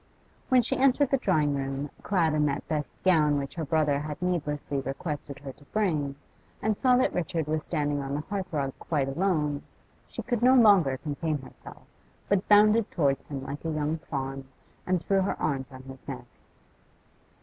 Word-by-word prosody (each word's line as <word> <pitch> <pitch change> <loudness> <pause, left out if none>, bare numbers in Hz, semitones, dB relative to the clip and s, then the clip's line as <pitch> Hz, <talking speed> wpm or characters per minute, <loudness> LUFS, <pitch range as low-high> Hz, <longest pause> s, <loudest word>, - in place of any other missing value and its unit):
When 255 -2 +5
she - - +1
entered 270 +1 +3
the 275 - +4
drawing 155 - +2
room, 135 +1 -3
clad 170 -6 +1
in 150 -1 +2
that 140 0 -3
best 150 -2 -3
gown 155 -6 +4
which 140 0 -4
her 165 - -4
brother 150 -2 +2
had 150 0 -5
needlessly 150 -5 -2
requested 140 +1 -5
her 140 -1 -8
to 145 - -20
bring, 155 -9 -1 0.4
and 215 0 0
saw 250 +3 +4
that 255 +1 +2
Richard 165 -2 -1
was 155 0 -1
standing 145 -3 -1
on 135 0 -3
the 150 - -1
hearth 190 +2 -4
rug 140 -4 -1
quite 145 -5 -1
alone, 150 -2 0 0.5
she - - -7
could 240 -3 -1
no 255 +2 +6
longer 195 - +6
contain 150 +2 -2
herself, - - -13 0.4
but 200 -1 +1
bounded 210 +1 +6
towards 140 -5 0
him 135 -2 -5
like 140 +2 -6
a 165 - -2
young 155 +1 -1
fawn, 135 -3 -5 0.4
and 180 -2 +1
threw 195 -1 +2
her 190 - -1
arms 135 -3 -2
on 130 0 -11
his 130 0 -12
neck. 60 - -6
150 Hz, 185 wpm, -28 LUFS, 140-185 Hz, 0.5 s, no